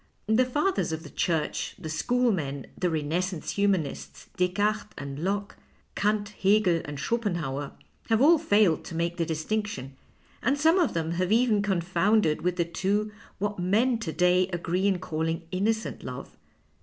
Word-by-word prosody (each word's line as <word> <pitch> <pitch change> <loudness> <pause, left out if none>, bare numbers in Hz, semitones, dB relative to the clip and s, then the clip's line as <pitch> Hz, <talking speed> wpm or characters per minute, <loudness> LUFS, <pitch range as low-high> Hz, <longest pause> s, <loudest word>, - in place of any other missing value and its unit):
" - - -41
The 220 +4 +3
Fathers 295 - 0
of 160 0 -4
the 150 - -11
Church, 160 -3 -1
the 170 - -7
schoolmen, 160 - 0
the 180 - 0
Renais 160 +1 0
sance 180 -4 -5
humanists, 195 -8 -1
Descartes 205 +4 0
and 140 +2 -6
Locke, 200 +1 -2 0.4
Kant, 205 0 0
Hegel, 195 -4 +2
and 145 -1 -6
Schopenhauer, 170 - -2 0.4
have 225 -1 +3
all 315 +5 +6
failed 205 - +3
to 165 - -7
make 170 +1 -1
the 165 -2 0
dis 155 -1 -3
tinction, 210 -12 -2 0.5
and 265 +5 +1
some 325 +5 +4
of 335 - +1
them 165 0 -1
have 180 +2 -1
even 225 -2 +4
confounded 190 -2 +2
with 180 0 0
the 170 -2 +1
two 200 +5 -1 0.3
what 205 0 -2
men 220 +7 +2
to 175 -8 -3
day 180 +2 +3
agree 180 +1 -1
in 195 -2 +2
calling 165 -1 -2
inno 200 +4 +2
cent 220 - -7
love. - - -8
185 Hz, 170 wpm, -27 LUFS, 165-215 Hz, 0.5 s, all